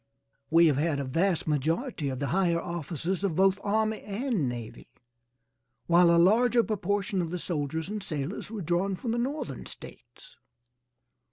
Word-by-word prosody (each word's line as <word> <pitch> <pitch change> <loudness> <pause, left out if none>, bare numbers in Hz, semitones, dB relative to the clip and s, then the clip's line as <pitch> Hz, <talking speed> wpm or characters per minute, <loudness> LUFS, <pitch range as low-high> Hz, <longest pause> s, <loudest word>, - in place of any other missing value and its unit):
We 165 +1 +6
have 150 -4 +3
had 150 -1 0
a - - -1
vast 165 +7 0
majority 155 - -1
of 130 - -4
the 140 - -2
higher 175 -3 +2
officers 170 +2 -3
of 190 -5 0
both 195 +1 +3
army 215 +1 0
and 210 - -1
navy, 120 -1 -7 1.0
while 175 0 +5
a 170 - +5
larger 235 +7 +4
proportion 200 -2 -1
of 170 - -3
the 180 - -3
soldiers 160 -2 -3
and 210 +1 -4
sailors 155 +2 -4
were 215 -4 -5
drawn 175 +4 0
from 230 +5 -4
the 235 - 0
Northern 275 +5 -3
States. - - -13
180 Hz, 160 wpm, -28 LUFS, 160-210 Hz, 1.0 s, We